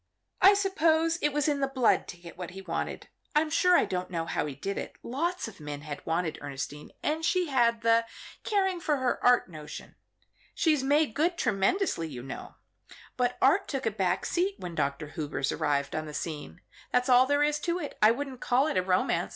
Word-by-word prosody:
I 395 Hz, +2 st, +8 dB
suppose 330 Hz, -4 st, +2 dB
it 295 Hz, -, +2 dB
was 295 Hz, +1 st, 0 dB
in 290 Hz, -2 st, +1 dB
the 275 Hz, -, +1 dB
blood 260 Hz, -4 st, +2 dB
to 175 Hz, -, -8 dB
get 170 Hz, -1 st, -12 dB
what 180 Hz, -1 st, -6 dB
he 190 Hz, +2 st, -9 dB
wanted. -, -, -4 dB, 0.3 s
I'm 305 Hz, +1 st, +2 dB
sure 360 Hz, +2 st, +5 dB
I -, -, +3 dB
don't 180 Hz, 0 st, -3 dB
know 165 Hz, -2 st, -2 dB
how 165 Hz, -, -2 dB
he 140 Hz, -, -6 dB
did 195 Hz, +8 st, -3 dB
it. -, -, -7 dB
Lots 335 Hz, +8 st, -2 dB
of 220 Hz, -, -11 dB
men 145 Hz, -1 st, -6 dB
had 145 Hz, -1 st, -7 dB
wanted 165 Hz, 0 st, -1 dB
Ernestine, 145 Hz, +1 st, -6 dB
and 315 Hz, +2 st, -1 dB
she 360 Hz, 0 st, +1 dB
had 235 Hz, -4 st, +2 dB
the 230 Hz, 0 st, +3 dB, 0.4 s
caring 385 Hz, -4 st, +1 dB
for 305 Hz, -3 st, 0 dB
her 260 Hz, -2 st, -1 dB
art 245 Hz, 0 st, +5 dB
notion 155 Hz, -3 st, -9 dB, 0.6 s
she's 310 Hz, -4 st, +2 dB
made 285 Hz, -1 st, +2 dB
good 335 Hz, +6 st, +1 dB
tremendously, 200 Hz, -, +1 dB
you 125 Hz, -5 st, -8 dB
know 135 Hz, -, -8 dB, 0.6 s
but 250 Hz, 0 st, 0 dB
art 320 Hz, +10 st, +4 dB
took 270 Hz, -3 st, -3 dB
a 225 Hz, -, +1 dB
back 190 Hz, -3 st, 0 dB
seat 375 Hz, +3 st, 0 dB
when 175 Hz, -1 st, -7 dB
Dr. 140 Hz, 0 st, -2 dB
Hubers 145 Hz, -3 st, -2 dB
arrived 140 Hz, -1 st, -1 dB
on 155 Hz, 0 st, -3 dB
the 150 Hz, -, -7 dB
scene. 160 Hz, +1 st, -6 dB, 0.3 s
That's 250 Hz, 0 st, +2 dB
all 255 Hz, 0 st, +6 dB
there 285 Hz, +1 st, +3 dB
is 300 Hz, 0 st, +1 dB
to 345 Hz, 0 st, -1 dB
it. 300 Hz, -5 st, -6 dB
I 215 Hz, -, +8 dB
wouldn't 260 Hz, +1 st, -3 dB
call 255 Hz, +3 st, +2 dB
it 310 Hz, -, -1 dB
a -, -, +4 dB
romance. 185 Hz, 0 st, +1 dB
245 Hz, 210 wpm, -28 LUFS, -, 0.6 s, I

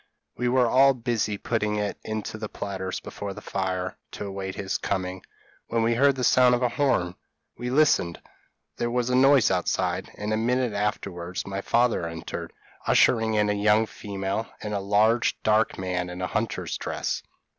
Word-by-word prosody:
We 125 Hz, +1 st, 0 dB
were 125 Hz, 0 st, +4 dB
all 135 Hz, +3 st, +5 dB
busy 115 Hz, -4 st, -1 dB
putting 105 Hz, -1 st, -1 dB
it 105 Hz, -1 st, -1 dB
into 110 Hz, 0 st, -4 dB
the 110 Hz, -1 st, -5 dB
platters 95 Hz, -2 st, -4 dB
before 100 Hz, -1 st, -6 dB
the -, -, -7 dB
fire, 95 Hz, -1 st, -3 dB, 0.2 s
to -, -, -5 dB
await 95 Hz, -1 st, -5 dB
his 95 Hz, -1 st, -2 dB
coming, 95 Hz, -1 st, -2 dB, 0.5 s
when 115 Hz, -1 st, 0 dB
we 115 Hz, +1 st, +3 dB
heard 140 Hz, +3 st, +4 dB
the 130 Hz, -, -3 dB
sound 125 Hz, 0 st, +5 dB
of 120 Hz, -, -2 dB
a 125 Hz, -, +3 dB
horn. 115 Hz, -11 st, +1 dB, 0.4 s
We 125 Hz, -, -4 dB
listened 130 Hz, -, +3 dB, 0.6 s
there 120 Hz, -, -1 dB
was 125 Hz, +1 st, 0 dB
a -, -, +3 dB
noise 135 Hz, -3 st, +5 dB
outside, 90 Hz, -1 st, 0 dB
and 105 Hz, +1 st, -2 dB
a -, -, +1 dB
minute 125 Hz, +1 st, +1 dB
afterwards 95 Hz, -4 st, -3 dB
my 100 Hz, 0 st, -4 dB
father 115 Hz, -6 st, +2 dB
entered, 80 Hz, 0 st, -6 dB, 0.4 s
ushering 110 Hz, -2 st, +4 dB
in 105 Hz, 0 st, +3 dB
a 105 Hz, -, +2 dB
young 105 Hz, +2 st, +3 dB
female, 100 Hz, +1 st, -4 dB
and 105 Hz, -, -5 dB
a 100 Hz, -, 0 dB
large 105 Hz, +4 st, +2 dB
dark 110 Hz, +1 st, +2 dB
man 90 Hz, -1 st, -2 dB
in 90 Hz, 0 st, -7 dB
a 90 Hz, -, -1 dB
hunter's 105 Hz, -6 st, -2 dB
dress. -, -, -2 dB
105 Hz, 175 wpm, -26 LUFS, 95-120 Hz, 0.6 s, all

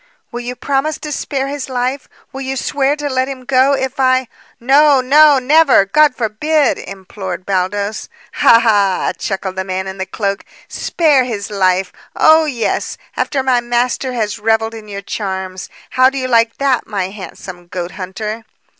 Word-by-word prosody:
"Will 240 Hz, -, -5 dB
you 245 Hz, +1 st, -5 dB
promise 280 Hz, +4 st, -1 dB
to 300 Hz, -, -6 dB
spare 275 Hz, -1 st, -2 dB
his 280 Hz, -1 st, -5 dB
life? 255 Hz, +2 st, -2 dB, 0.2 s
Will 270 Hz, -, -6 dB
you 265 Hz, 0 st, -3 dB
swear 275 Hz, +2 st, 0 dB
to 295 Hz, -1 st, -4 dB
let 260 Hz, -1 st, 0 dB
him 260 Hz, -2 st, -7 dB
go, 265 Hz, +1 st, +3 dB
if 265 Hz, +1 st, -4 dB
I 255 Hz, -1 st, +2 dB, 0.2 s
" -, -, -30 dB
"No, 280 Hz, +3 st, +4 dB
no, 290 Hz, +3 st, +5 dB
never! 275 Hz, -4 st, +4 dB
God 290 Hz, +7 st, +3 dB
forbid!" 270 Hz, +6 st, 0 dB
implored 190 Hz, -2 st, -7 dB
Baldos. 200 Hz, +2 st, -2 dB, 0.2 s
"Ha, 230 Hz, -, +6 dB
ha!" 205 Hz, -5 st, +2 dB
chuckled 190 Hz, -1 st, -4 dB
the 190 Hz, -, -1 dB
man 190 Hz, 0 st, -3 dB
in 190 Hz, 0 st, -7 dB
the 190 Hz, -, -3 dB
cloak. 200 Hz, -2 st, -3 dB, 0.2 s
"Spare 300 Hz, -6 st, +2 dB
his 215 Hz, -4 st, -5 dB
life! 185 Hz, -2 st, +1 dB, 0.2 s
Oh, 315 Hz, 0 st, +5 dB
yes; 250 Hz, -7 st, -2 dB, 0.2 s
after 270 Hz, -3 st, -1 dB
my 255 Hz, -2 st, +2 dB
master 245 Hz, +2 st, -1 dB
has 215 Hz, -3 st, -2 dB
revelled 225 Hz, +1 st, +1 dB
in 220 Hz, -1 st, -10 dB
your 200 Hz, -1 st, -7 dB
charms. 190 Hz, -2 st, -5 dB, 0.2 s
How 255 Hz, 0 st, +5 dB
do 270 Hz, -, -7 dB
you 255 Hz, -1 st, -2 dB
like 230 Hz, -2 st, +2 dB
that, 275 Hz, -3 st, 0 dB
my 195 Hz, -3 st, -2 dB
handsome 190 Hz, -3 st, -10 dB
goathunter?" 190 Hz, +5 st, -5 dB
240 Hz, 170 wpm, -16 LUFS, 200-270 Hz, 0.2 s, Ha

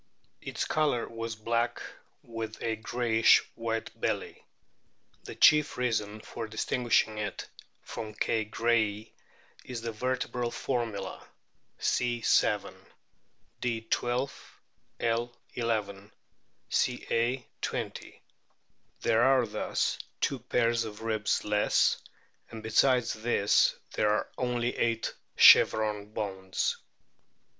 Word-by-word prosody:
Its -, -, -3 dB
colour 145 Hz, -6 st, +1 dB
was 115 Hz, -1 st, -5 dB
black, 115 Hz, +2 st, -1 dB, 0.4 s
with 115 Hz, -2 st, -6 dB
a 115 Hz, -1 st, 0 dB
greyish 115 Hz, 0 st, +3 dB
white 115 Hz, -1 st, -3 dB
belly. -, -, -2 dB, 0.8 s
The -, -, -8 dB
chief 150 Hz, -1 st, +5 dB
reason 110 Hz, -4 st, -1 dB
for 115 Hz, +1 st, -6 dB
distinguishing 110 Hz, 0 st, +1 dB
it 105 Hz, -1 st, -4 dB, 0.4 s
from 105 Hz, -1 st, -7 dB
K. 110 Hz, +1 st, 0 dB
grayi 110 Hz, -1 st, 0 dB, 0.5 s
is 125 Hz, -3 st, -6 dB
the 115 Hz, 0 st, -3 dB
vertebral 125 Hz, +1 st, -2 dB
formula: 115 Hz, -7 st, -3 dB, 0.5 s
C. 120 Hz, -1 st, 0 dB
7; -, -, +2 dB, 0.8 s
D. 115 Hz, -2 st, -1 dB
12; 120 Hz, +4 st, -3 dB, 0.4 s
L. 120 Hz, +1 st, -1 dB, 0.2 s
11; 105 Hz, -4 st, -2 dB, 0.6 s
Ca. 120 Hz, +2 st, 0 dB, 0.2 s
20. -, -, -5 dB, 0.8 s
There 115 Hz, -, +3 dB
are 130 Hz, -1 st, +4 dB
thus 105 Hz, -, -1 dB, 0.2 s
two 135 Hz, -, 0 dB
pairs 120 Hz, -1 st, +1 dB
of 110 Hz, 0 st, -8 dB
ribs 110 Hz, -2 st, 0 dB
less, 105 Hz, 0 st, +2 dB, 0.5 s
and 110 Hz, -1 st, -9 dB
besides 125 Hz, +3 st, +3 dB
this 110 Hz, -2 st, +2 dB, 0.2 s
there 105 Hz, -, +2 dB
are 105 Hz, -, 0 dB
only 125 Hz, -1 st, -1 dB
eight 115 Hz, -1 st, 0 dB, 0.2 s
chevron 105 Hz, -1 st, +6 dB
bones. 95 Hz, -3 st, -2 dB
115 Hz, 100 wpm, -29 LUFS, 110-120 Hz, 0.8 s, chevron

